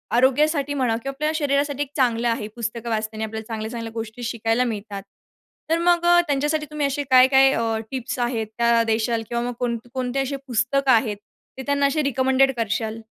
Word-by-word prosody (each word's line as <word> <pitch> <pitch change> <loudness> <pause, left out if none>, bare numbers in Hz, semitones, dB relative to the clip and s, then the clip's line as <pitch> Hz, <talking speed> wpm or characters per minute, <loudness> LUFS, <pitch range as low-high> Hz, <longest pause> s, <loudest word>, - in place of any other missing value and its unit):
आरोग्यासाठी 285 +3 +2
म्हणा 255 -5 +1
किंवा 275 - -4
आपल्या 305 +2 0
शरीरासाठी 285 -1 0
एक 280 - -12
चांगलं 240 -3 +2
आहे. 230 -2 -2
पुस्तकं 235 0 -4
वाचल्याने 220 0 -2
आपल्याला 220 0 -6
चांगल्या-चांगल्या 225 +1 -5
गोष्टी 225 +1 -6
शिकायला 230 +1 0
मिळतात. 200 -1 -7 0.7
तर 325 - +3
मग 345 0 +2
अ, 350 0 +6
त्यांच्यासाठी 295 +2 0
तुम्ही 300 -1 -1
असे 280 +1 -2
काय-काय 265 +1 +6
अ, 225 -1 0
टिप्स 255 -1 -4
आहेत, 240 -2 -1
त्या 235 0 +3
देशाल 225 +1 0
किंवा 235 0 -1
मग 245 0 -3
कोणकोणते 245 +2 -3
असे 270 +1 -2
पुस्तकं 260 +3 +1
आहेत, 220 -3 +2 0.4
ते 265 - -5
त्यांना 285 0 +1
असे 290 +2 +1
रिकमेंडेड 265 0 +2
करशाल? 225 0 -2
245 Hz, 175 wpm, -23 LUFS, 225-275 Hz, 0.7 s, अ